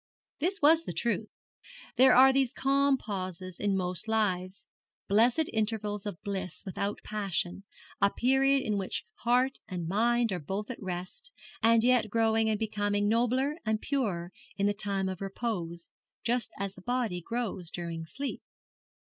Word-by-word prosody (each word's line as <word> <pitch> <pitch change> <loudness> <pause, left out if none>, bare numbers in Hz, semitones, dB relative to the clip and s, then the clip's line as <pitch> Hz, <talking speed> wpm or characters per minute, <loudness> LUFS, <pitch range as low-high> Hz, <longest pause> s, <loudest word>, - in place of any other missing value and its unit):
This 360 +3 -1
was 325 +2 +6
the - - -4
truth. 220 -2 -1 0.7
There 260 0 +7
are 265 +1 +8
these 265 -1 +2
calm 275 0 +3
pauses 185 -4 -5
in 200 -1 +1
most 180 +3 -2
lives 190 -4 0 0.4
blessed 240 +10 +3
intervals 215 -2 -1
of 175 -5 -5
bliss 190 -2 -4
without 200 +2 -3
passion 195 -2 -2 0.4
a 200 - +6
period 270 +4 +3
in 210 -2 0
which 190 - -3
heart 250 +3 +2
and 175 -3 -4
mind 230 +4 +2
are 180 - -1
both 195 - -4
at 255 - -8
rest, 185 - -6 0.3
and 230 0 +5
yet 245 -3 +3
growing 225 0 +2
and 215 - +1
becoming 205 -1 0
nobler 250 +7 +1
and 215 -1 0
purer 200 -12 -2 0.3
in 200 - +1
the 205 - +3
time 200 -2 -1
of 185 0 -5
repose, 190 -5 -4 0.3
just 240 -1 0
as 195 -1 -3
the 185 - -14
body 235 -5 -1
grows 205 -5 -3
during 165 -2 -5
sleep. 275 - -5
215 Hz, 155 wpm, -30 LUFS, 190-245 Hz, 0.7 s, are